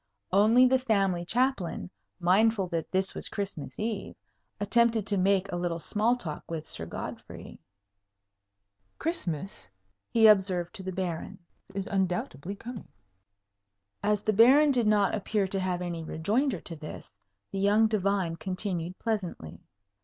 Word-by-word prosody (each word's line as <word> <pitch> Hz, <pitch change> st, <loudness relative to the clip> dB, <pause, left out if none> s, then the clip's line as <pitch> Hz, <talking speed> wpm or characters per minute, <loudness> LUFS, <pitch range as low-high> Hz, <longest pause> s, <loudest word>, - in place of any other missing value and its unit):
Only 220 Hz, +6 st, +6 dB
the 260 Hz, +1 st, +4 dB
family 195 Hz, -8 st, +1 dB
Chaplain, 230 Hz, -4 st, -1 dB, 0.3 s
mindful 195 Hz, +3 st, +3 dB
that 165 Hz, -3 st, -3 dB
this 190 Hz, 0 st, 0 dB
was -, -, -6 dB
Christmas 160 Hz, -10 st, -5 dB
Eve, 215 Hz, -2 st, -3 dB, 0.4 s
attempted 230 Hz, 0 st, +2 dB
to 210 Hz, -, +1 dB
make 195 Hz, +1 st, +2 dB
a -, -, -2 dB
little 175 Hz, -1 st, -1 dB
small 215 Hz, +8 st, +1 dB
talk 160 Hz, -11 st, -5 dB
with 160 Hz, -2 st, -5 dB
Sir 80 Hz, -, -6 dB
Godfrey. -, -, -8 dB, 1.4 s
"Christmas," 190 Hz, -, -3 dB, 0.4 s
he 225 Hz, -1 st, +4 dB
observed 190 Hz, -4 st, +4 dB
to 210 Hz, -, -7 dB
the 190 Hz, 0 st, -4 dB
Baron, 175 Hz, -3 st, -4 dB, 0.4 s
"is 195 Hz, -1 st, -2 dB
undoubtedly 185 Hz, -3 st, -2 dB
coming." 230 Hz, +2 st, -8 dB, 1.1 s
As 210 Hz, 0 st, +1 dB
the 215 Hz, -, +1 dB
Baron 270 Hz, +8 st, +6 dB
did 240 Hz, -5 st, +2 dB
not 205 Hz, -2 st, +3 dB
appear 210 Hz, -1 st, 0 dB
to 195 Hz, +1 st, -2 dB
have 180 Hz, -1 st, -1 dB
any 170 Hz, -2 st, -4 dB
rejoinder 205 Hz, -, 0 dB
to 165 Hz, -, -6 dB
this, 155 Hz, 0 st, -9 dB, 0.4 s
the 195 Hz, -, -3 dB
young 205 Hz, +3 st, +4 dB
divine 200 Hz, -5 st, 0 dB
continued, 185 Hz, 0 st, -3 dB
pleasantly. 185 Hz, -, -4 dB
195 Hz, 140 wpm, -28 LUFS, 175-220 Hz, 1.4 s, Only